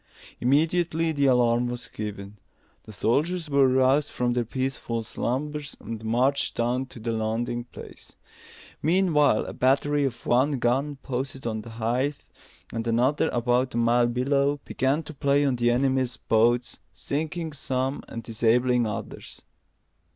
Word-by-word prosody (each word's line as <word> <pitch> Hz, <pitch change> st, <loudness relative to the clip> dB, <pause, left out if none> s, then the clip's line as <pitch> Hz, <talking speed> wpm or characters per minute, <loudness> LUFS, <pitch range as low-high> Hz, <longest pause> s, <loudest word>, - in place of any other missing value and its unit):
Immediately 160 Hz, +4 st, +2 dB
the 140 Hz, -2 st, +1 dB
alarm 120 Hz, -1 st, +3 dB
was 120 Hz, -1 st, -5 dB
given. 105 Hz, -2 st, -7 dB, 0.5 s
The 110 Hz, -, -10 dB
soldiers 150 Hz, -, 0 dB
were 140 Hz, -1 st, +5 dB
roused 130 Hz, +3 st, +3 dB
from 120 Hz, -1 st, -1 dB
their 120 Hz, -1 st, 0 dB
peaceful 130 Hz, -2 st, -3 dB
slumbers, 145 Hz, +6 st, -3 dB
and 115 Hz, -1 st, -7 dB
marched 125 Hz, +5 st, +1 dB
down 125 Hz, +3 st, 0 dB
to 125 Hz, -, -12 dB
the 115 Hz, +1 st, -3 dB
landing 115 Hz, +2 st, -2 dB
place. -, -, -12 dB, 0.7 s
Meanwhile, 155 Hz, -, +3 dB
a -, -, -6 dB
battery 145 Hz, +3 st, +2 dB
of 125 Hz, -3 st, -5 dB
one 130 Hz, +5 st, +3 dB
gun, 135 Hz, +5 st, 0 dB
posted 135 Hz, 0 st, -4 dB
on 110 Hz, -2 st, -2 dB
the 115 Hz, -, -11 dB
heights, 120 Hz, +5 st, -2 dB, 0.5 s
and 115 Hz, 0 st, -3 dB
another 125 Hz, +5 st, +2 dB
about 120 Hz, +1 st, 0 dB
a -, -, 0 dB
mile 120 Hz, +1 st, +3 dB
below, 140 Hz, +4 st, +1 dB
began 135 Hz, +5 st, 0 dB
to 155 Hz, -, -9 dB
play 140 Hz, 0 st, +2 dB
on 130 Hz, -3 st, +1 dB
the 120 Hz, 0 st, +2 dB
enemy's 130 Hz, 0 st, +1 dB
boats, 120 Hz, +1 st, +1 dB
sinking 155 Hz, -, -4 dB
some 130 Hz, 0 st, -2 dB
and 115 Hz, -, -7 dB
disabling 120 Hz, +2 st, +2 dB
others. 105 Hz, -, -7 dB
125 Hz, 145 wpm, -26 LUFS, 120-140 Hz, 0.7 s, were